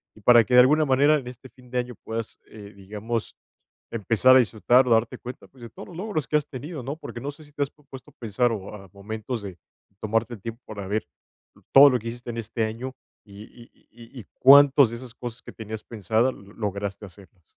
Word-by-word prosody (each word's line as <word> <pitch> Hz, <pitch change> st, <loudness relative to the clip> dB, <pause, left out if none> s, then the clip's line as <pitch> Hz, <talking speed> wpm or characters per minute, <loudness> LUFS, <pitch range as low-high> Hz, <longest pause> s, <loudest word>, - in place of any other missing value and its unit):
y 110 Hz, -, -17 dB
para 120 Hz, +1 st, +6 dB
que 125 Hz, -, -4 dB
de 125 Hz, -, +8 dB
alguna 150 Hz, +5 st, +5 dB
manera, 140 Hz, +3 st, +4 dB
en 135 Hz, -, -7 dB
este 125 Hz, +1 st, -11 dB
fin 125 Hz, -1 st, -20 dB
de 125 Hz, -, 0 dB
año 125 Hz, 0 st, -5 dB
puedas, 115 Hz, 0 st, -6 dB
eh, 105 Hz, -1 st, -12 dB
digamos, 105 Hz, +4 st, -5 dB, 0.6 s
empezar 115 Hz, +4 st, +4 dB
a -, -, +7 dB
disfrutar 125 Hz, +2 st, +3 dB
o -, -, 0 dB
darte 115 Hz, 0 st, +2 dB
cuenta, 125 Hz, +1 st, -10 dB
pues, 130 Hz, -3 st, -18 dB
de 115 Hz, -, -8 dB
todos -, -, -11 dB
los 170 Hz, -, -11 dB
logros 190 Hz, -7 st, -3 dB
que 150 Hz, -, +2 dB
has 150 Hz, -, -4 dB
tenido, 145 Hz, +1 st, -7 dB
¿no? 140 Hz, +5 st, -5 dB
Porque, 120 Hz, -, -8 dB
no 145 Hz, +3 st, -4 dB
sé, 155 Hz, +2 st, -16 dB
si 145 Hz, -, -20 dB
te 145 Hz, -, -1 dB
has 140 Hz, -, -6 dB
pu 150 Hz, -, -27 dB
puesto 135 Hz, -1 st, -12 dB
a -, -, -38 dB
pensar, 120 Hz, +1 st, 0 dB
o, 100 Hz, -1 st, -7 dB
a 95 Hz, -2 st, -12 dB
momentos 110 Hz, +3 st, -6 dB
de 95 Hz, -3 st, -8 dB, 0.4 s
tomarte 115 Hz, +2 st, -1 dB
el 100 Hz, -, -17 dB
tiempo 115 Hz, +2 st, -7 dB
para 100 Hz, -3 st, -7 dB
ver 105 Hz, +2 st, -2 dB, 0.7 s
todo 140 Hz, +1 st, +9 dB
lo 125 Hz, -, +1 dB
que 115 Hz, -, -6 dB
hiciste 120 Hz, +1 st, -9 dB
en 115 Hz, -, -8 dB
este 115 Hz, 0 st, -3 dB
año 120 Hz, +4 st, -6 dB, 0.3 s
y 100 Hz, 0 st, -12 dB
y 120 Hz, +1 st, -16 dB, 0.2 s
y 120 Hz, +2 st, -13 dB
y -, -, -17 dB
cuántos 140 Hz, -2 st, +7 dB
de 120 Hz, -, -6 dB
esas 120 Hz, -1 st, -12 dB
cosas 120 Hz, -2 st, -8 dB
que -, -, -10 dB
tenías 110 Hz, -1 st, -8 dB
pensadas 115 Hz, +3 st, 0 dB
lograste 100 Hz, 0 st, -6 dB
hacerlas. 95 Hz, 0 st, -18 dB
120 Hz, 230 wpm, -24 LUFS, 110-130 Hz, 0.7 s, todo